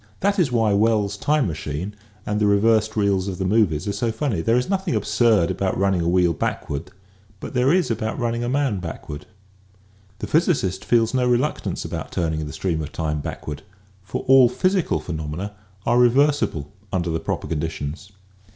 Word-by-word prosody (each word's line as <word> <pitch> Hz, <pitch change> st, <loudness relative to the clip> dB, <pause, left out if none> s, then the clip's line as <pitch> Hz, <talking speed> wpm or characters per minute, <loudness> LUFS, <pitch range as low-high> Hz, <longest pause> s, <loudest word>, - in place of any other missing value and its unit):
That 200 Hz, +1 st, +2 dB
is 155 Hz, -8 st, +2 dB
why 115 Hz, -3 st, +2 dB
Wells's 105 Hz, -1 st, +2 dB
Time 150 Hz, +7 st, +1 dB
Machine 80 Hz, +3 st, -4 dB, 0.2 s
" 105 Hz, -, -30 dB
and 105 Hz, 0 st, -1 dB
the 105 Hz, -, +3 dB
reversed 110 Hz, +1 st, +3 dB
reels 100 Hz, -2 st, +1 dB
of 95 Hz, -2 st, -4 dB
the 95 Hz, -, -2 dB
movies 95 Hz, -5 st, +2 dB
are 100 Hz, -, -1 dB
so 115 Hz, +3 st, -1 dB
funny. 110 Hz, -, -1 dB
There 115 Hz, +6 st, +2 dB
is 125 Hz, -, 0 dB
nothing 190 Hz, -3 st, -1 dB
absurd 110 Hz, -8 st, +2 dB
about 95 Hz, -1 st, -1 dB
running 95 Hz, -2 st, +2 dB
a 85 Hz, -, 0 dB
wheel 90 Hz, -1 st, +3 dB
backward 75 Hz, +3 st, -3 dB, 0.5 s
but -, -, -7 dB
there 125 Hz, +2 st, +3 dB
is 180 Hz, -6 st, +2 dB
about 110 Hz, 0 st, -2 dB
running 120 Hz, -2 st, -1 dB
a 120 Hz, -, -1 dB
man 135 Hz, -6 st, 0 dB
backward.* 80 Hz, -3 st, -7 dB, 0.9 s
The -, -, -5 dB
physicist 150 Hz, -, +1 dB
feels 115 Hz, -1 st, +2 dB
no 125 Hz, -1 st, +2 dB
reluctance 125 Hz, +5 st, 0 dB
about -, -, -5 dB
turning 80 Hz, -3 st, -1 dB
the -, -, -6 dB
stream 85 Hz, -4 st, -1 dB
of 75 Hz, -, -6 dB
time 75 Hz, -2 st, -2 dB
backward 75 Hz, 0 st, -6 dB, 0.4 s
for 95 Hz, -, -5 dB
all 130 Hz, -2 st, +7 dB
physical 185 Hz, -, +1 dB
phenomena 80 Hz, +5 st, -5 dB, 0.3 s
are 120 Hz, +1 st, +3 dB
reversible 125 Hz, -, +2 dB, 0.2 s
under 90 Hz, -3 st, -1 dB
the 80 Hz, -, -1 dB
proper -, -, -3 dB
conditions. 80 Hz, +4 st, -4 dB
105 Hz, 180 wpm, -22 LUFS, 85-125 Hz, 0.9 s, all